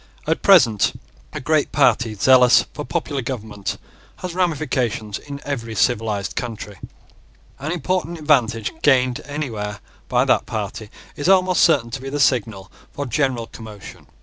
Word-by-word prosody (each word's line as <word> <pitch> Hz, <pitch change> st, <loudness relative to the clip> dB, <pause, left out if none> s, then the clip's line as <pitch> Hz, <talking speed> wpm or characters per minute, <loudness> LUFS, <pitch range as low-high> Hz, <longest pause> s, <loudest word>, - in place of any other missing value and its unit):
At 160 Hz, +1 st, 0 dB
present 125 Hz, -, +4 dB, 0.3 s
a -, -, -5 dB
great 155 Hz, +2 st, +1 dB
party 125 Hz, -5 st, +2 dB
zealous 125 Hz, +4 st, +5 dB
for -, -, -5 dB
popular 140 Hz, 0 st, -3 dB
government 110 Hz, -6 st, -5 dB, 0.4 s
has 180 Hz, -2 st, -6 dB
ramifications 135 Hz, -, -1 dB
in 140 Hz, -1 st, -8 dB
every 115 Hz, -6 st, -4 dB
civilised 105 Hz, 0 st, 0 dB
country. 105 Hz, -5 st, -6 dB, 0.8 s
And 150 Hz, +4 st, -4 dB
important 175 Hz, 0 st, -2 dB
advantage 120 Hz, -8 st, +1 dB
gained 130 Hz, -1 st, +3 dB
anywhere 110 Hz, -9 st, -4 dB, 0.3 s
by -, -, +2 dB
that -, -, +2 dB
party 105 Hz, 0 st, -5 dB, 0.3 s
is 145 Hz, +5 st, -1 dB
almost 185 Hz, -1 st, +4 dB
certain 140 Hz, -8 st, +3 dB
to 125 Hz, -, -5 dB
be 135 Hz, -, -6 dB
the 145 Hz, +2 st, -3 dB
signal 110 Hz, -8 st, 0 dB, 0.2 s
for 145 Hz, -, -5 dB
general 130 Hz, -2 st, 0 dB
commotion. 110 Hz, -3 st, -11 dB
125 Hz, 140 wpm, -21 LUFS, 110-150 Hz, 0.8 s, zealous